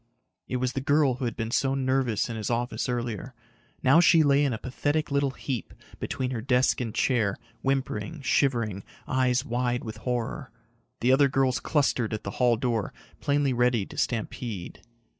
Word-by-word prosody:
It - - -3
was 125 0 0
the 135 - -2
girl 145 -1 +3
who 130 - -3
had 115 - -2
been 115 0 -3
so 135 +2 +1
nervous 130 -4 +1
in 115 - -5
his 110 -2 -3
office 120 +2 -1
earlier. 120 0 -3 0.5
Now 135 +5 +6
she 170 -2 +6
lay 140 0 +4
in 140 - +1
a 115 - -2
pathetic 145 +5 -2
little 140 0 +2
heap 130 -2 -5 0.2
between 130 -1 -2
her 120 -3 -3
desk 125 +1 +2
and 115 -3 -3
chair, 115 -3 +1 0.2
whimpering, 135 +1 -2
shivering, 115 -9 +1 0.2
eyes 130 0 +1
wide 125 0 -1
with 110 - -6
horror. 125 -2 -3 0.5
The 125 - +4
other 140 +2 +5
girls 130 -1 +1
clustered 125 -7 +1
at 110 - -7
the 100 - -4
hall 120 -2 +4
door, 115 -4 -1 0.2
plainly 140 -2 +1
ready 120 -4 +2
to - - -12
stampede. 110 -4 -3
125 Hz, 175 wpm, -27 LUFS, 115-135 Hz, 0.5 s, Now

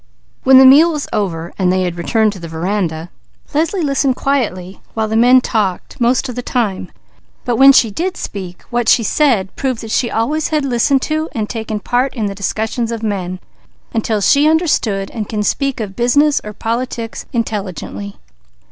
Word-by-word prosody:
When 265 0 +7
the 265 - +8
meal 300 +6 +7
was 300 -2 -4
over 170 -5 -2
and 180 -1 +2
they 185 0 +1
had 175 -2 -2
returned 215 +5 +1
to 195 - -10
the 170 - -7
veranda, 165 0 -3 0.4
Leslie 330 +5 0
listened 275 -2 +1
quietly 200 -11 -2
while 220 -1 0
the 220 - -2
men 250 +3 +6
talked, 210 -3 -2
most 250 +3 +2
of 250 - -5
the 245 - -4
time, 210 -8 -2 0.5
but 240 -2 0
when 270 +1 +8
she 230 -5 +4
did 360 - -3
speak, 185 -3 -7
what 240 -1 +1
she 235 - +4
said 215 -5 +1
proved 260 -4 -2
that 225 -2 -7
she 235 - +1
always 295 +8 -1
had 305 -3 -1
listened 260 +1 +1
to 310 +1 -2
and 215 -2 -2
taken 220 -2 -4
part 250 +6 -1
in 220 -4 -2
the 200 - -3
discussions 220 +4 -2
of 230 -1 -5
men, 185 -4 -3 0.5
until 220 -2 -1
she 285 +8 +4
understood 250 - 0
and 215 -3 -5
could 210 -2 -2
speak 275 +1 -1
of 200 -3 -5
business 285 +5 +2
or 210 - -7
politics 230 +1 -4
intelligently. 200 -3 -4
225 Hz, 185 wpm, -16 LUFS, 200-265 Hz, 0.5 s, the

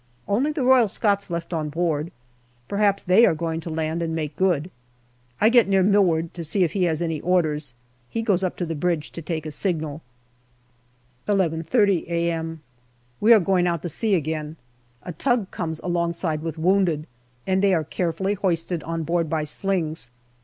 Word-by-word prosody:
Only 250 +9 +1
the 295 -3 -2
Royal 255 -2 +5
Scots 200 -1 0
left 170 0 -4
on 155 -2 -2
board. 160 0 -1 0.6
Perhaps 200 -1 +1
they 190 +5 +5
are 165 - +5
going 165 0 -2
to 165 - -7
land 160 +1 -2
and 165 -1 -2
make 155 -2 -3
good. 180 -3 +1 0.7
I 215 - +5
get 240 -3 +5
near 195 -1 +3
Milward 180 -5 +2
to 170 - -6
see 185 +5 +1
if 170 - +1
he 190 -3 +1
has 165 0 0
any 165 -3 -2
orders. 155 -7 0 0.3
He 225 - -2
goes 195 -4 +1
up 185 - -2
to 175 - -2
the 165 - -3
bridge 160 -1 -1
to 170 - -7
take 160 -1 -4
a 155 - -4
signal. 155 -3 -2 1.3
11.30 190 +1 +1
a.m. 165 -2 -2 0.6
We 220 - +4
are 225 - +9
going 180 -1 +2
out 170 -4 -1
to 175 - -2
sea 205 +6 +1
again. 155 -1 -3 0.5
A 180 - -6
tug 240 - 0
comes 160 -2 -3
alongside 170 -2 -1
with 165 -1 -5
wounded, 170 -3 +2 0.4
and 190 0 +1
they 195 -2 +4
are 160 - 0
carefully 180 +5 -1
hoisted 175 -4 -1
on 165 +1 -3
board 165 0 0
by 160 -1 0
slings. 160 -4 -1
170 Hz, 180 wpm, -23 LUFS, 160-195 Hz, 1.3 s, are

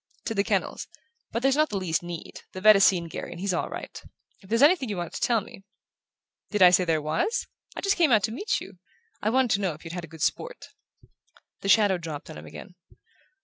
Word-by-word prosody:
"To 225 - -2
the 200 -2 +1
kennels. - - -2 0.4
But 230 - -3
there's 270 0 +3
not 305 +1 +2
the 205 - -2
least 175 -4 -1
need. 175 -1 -8
The 185 - -7
vet 215 +1 +8
has 195 - +4
seen 180 -3 +3
Garry 160 - -6
and 170 - -9
he's 195 0 -1
all - - -1
right. - - -8 0.4
If 190 - -18
there's 230 +4 +3
anything 295 -5 +4
you 205 - -3
wanted 175 -2 -5
to - - -6
tell 230 -3 +2
me 195 - -13 0.4
" - - -63
"Did 210 -3 +3
I 180 - +9
say 180 0 +4
there 165 -2 +1
was? 160 - -1 0.3
I - - -5
just 395 0 +1
came 330 -6 +3
out 215 -4 +4
to 220 - 0
meet 400 - -1
you 190 -2 -12 0.4
I 210 - +1
wanted 255 0 +2
to 200 - +2
know 185 -4 0
if 150 - -14
you'd 165 - -7
had 175 -3 -6
good 160 -1 -6
sport." - - -3 0.9
The 195 - -4
shadow 200 -2 +4
dropped 155 -4 -7
on - - -9
him 75 - -12
again. 180 - -11
195 Hz, 240 wpm, -26 LUFS, 175-230 Hz, 0.9 s, I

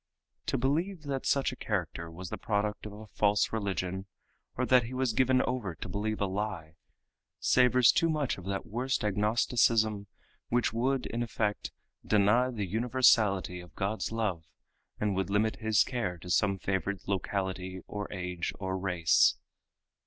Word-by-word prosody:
To - - +1
believe 155 +7 -1
that 135 -2 -3
such 140 0 +2
a - - -7
character 85 -7 -3
was 90 +2 -8
the - - -3
product 105 -1 -1
of 105 - -9
a 110 +1 -10
false 105 0 +1
religion, 95 -2 -2 0.5
or 130 - +1
that 125 -2 +4
he 125 +3 -6
was 130 -3 0
given 130 +2 +3
over 120 -9 -2
to - - -7
believe 105 +3 -2
a 100 - +1
lie, 95 -5 -4 0.6
savors 125 -1 +5
too 165 - +2
much 150 -9 -1
of 90 - -11
that 95 0 -3
worst 125 +4 -2
agnosticism 105 0 +2 0.4
which 120 -2 +1
would 130 +3 0
in 115 - -3
effect 110 -3 -2 0.3
deny 105 +5 +3
the 110 -5 -3
universality 110 -4 +2
of 90 -1 -13
God's 100 +4 -2
love 105 -8 -1 0.6
and 105 -2 0
would 95 +1 -1
limit 105 +2 +1
His 110 -2 +3
care 110 -9 -3
to 90 +2 -7
some 100 +2 +2
favored 95 +1 -2
locality 95 -1 -3
or 105 -1 -6
age 90 -3 -3
or 95 -1 -3
race. 90 -4 +3
105 Hz, 160 wpm, -30 LUFS, 95-120 Hz, 0.6 s, savors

